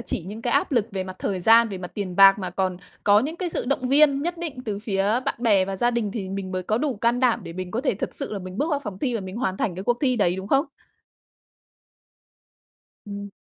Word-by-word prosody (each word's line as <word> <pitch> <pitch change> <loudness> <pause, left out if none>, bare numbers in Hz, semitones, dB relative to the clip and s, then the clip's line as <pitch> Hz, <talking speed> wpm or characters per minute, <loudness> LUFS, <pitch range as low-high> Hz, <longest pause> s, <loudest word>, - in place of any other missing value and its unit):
chỉ 220 - -3
những 215 +3 -7
cái 240 - 0
áp 280 0 +1
lực 235 -5 +2
về 190 -1 -2
mặt 185 0 -8
thời 190 -2 -2
gian, 225 +4 +6
về 195 - -6
mặt 180 -1 -7
tiền 190 -4 -4
bạc 195 0 +8
mà 185 - -4
còn 185 -2 -1 0.3
có 205 0 +6
những 300 +7 -3
cái 360 0 -2
sự - - -3
động 255 -1 -1
viên 280 0 +4
nhất 345 +1 -3
định 315 -7 -5
từ 210 -3 -3
phía 200 -2 -1 0.2
bạn - - -1
bè 210 -5 +3
và 195 0 -4
gia 240 +5 +2
đình 235 -4 -1
thì 200 -4 -4
mình 195 -1 -5
mới 185 0 -2
có 215 +4 0
đủ 275 -2 -1
can 235 +3 +1
đảm 250 -3 +3
để - - -8
mình 185 +1 -6
có 230 - -2
thể 265 -4 0
thật 195 - -5
sự - - -5
là 205 - -3
mình 185 +1 -8
bước 305 +4 0
vào 290 -2 0
phòng 210 -8 -7
thi 250 +2 -1
và 225 - -1
mình 190 +1 -7
hoàn 190 -6 -1
thành 195 -3 -1
cái 185 - -6
cuộc 240 +1 +1
thi 255 -3 +2
đấy, 180 -5 +2
đúng 190 +1 -6
không? 275 +4 +3 2.4
Ừm. 200 0 -7
210 Hz, 270 wpm, -24 LUFS, 190-250 Hz, 2.4 s, bạc